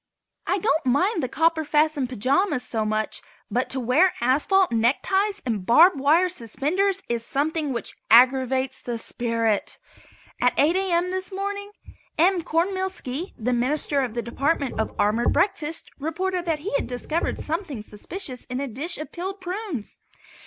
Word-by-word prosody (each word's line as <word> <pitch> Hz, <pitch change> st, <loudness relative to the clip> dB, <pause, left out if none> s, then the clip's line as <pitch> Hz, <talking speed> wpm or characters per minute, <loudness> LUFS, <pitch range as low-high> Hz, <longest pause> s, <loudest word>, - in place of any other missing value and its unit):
I 380 Hz, -, +2 dB
don't 380 Hz, -4 st, +1 dB
mind 345 Hz, -, +2 dB
the 255 Hz, -, -1 dB
copper 320 Hz, +4 st, +1 dB
fastened 300 Hz, -3 st, +1 dB
pajamas 265 Hz, -, +1 dB
so 220 Hz, -2 st, -2 dB
much, 215 Hz, 0 st, -1 dB, 0.3 s
but 250 Hz, +4 st, 0 dB
to 265 Hz, -, 0 dB
wear 270 Hz, +10 st, +3 dB
asphalt 300 Hz, +10 st, +3 dB
neckties 385 Hz, -, +1 dB
and 220 Hz, -6 st, -1 dB
barb 320 Hz, -, +6 dB
wire 300 Hz, +6 st, +3 dB
suspenders 360 Hz, -, -1 dB
is 235 Hz, -1 st, -2 dB
something 300 Hz, +3 st, -1 dB
which 235 Hz, -3 st, -3 dB, 0.2 s
aggravates 260 Hz, +2 st, +4 dB
the 240 Hz, -1 st, -4 dB
spirit. 230 Hz, -2 st, -1 dB, 0.6 s
At 250 Hz, -, +3 dB
8 315 Hz, +5 st, +4 dB
A.M. 365 Hz, -2 st, +1 dB
this 375 Hz, +1 st, -2 dB
morning 405 Hz, +1 st, -4 dB, 0.5 s
M. 355 Hz, +2 st, +4 dB
Cornmealski, 360 Hz, -2 st, -2 dB
the 250 Hz, +1 st, -1 dB
Minister 280 Hz, +3 st, +1 dB
of 245 Hz, -4 st, -3 dB
the 235 Hz, -, -2 dB
Department 275 Hz, +3 st, -1 dB
of 220 Hz, -, 0 dB
Armored 215 Hz, +3 st, +2 dB
Breakfasts, 335 Hz, -3 st, 0 dB
reported 360 Hz, +4 st, -2 dB
that 320 Hz, -3 st, -1 dB
he 370 Hz, -, -4 dB
had 280 Hz, -, 0 dB
discovered 280 Hz, +7 st, -2 dB
something 305 Hz, -, -4 dB
suspicious 255 Hz, -, -7 dB
in 250 Hz, -, -5 dB
the 280 Hz, -, -2 dB
dish 285 Hz, +9 st, -3 dB
of 305 Hz, -, -7 dB
peeled 380 Hz, +3 st, -5 dB
prunes. 370 Hz, -, -5 dB
295 Hz, 150 wpm, -24 LUFS, 250-365 Hz, 0.6 s, barb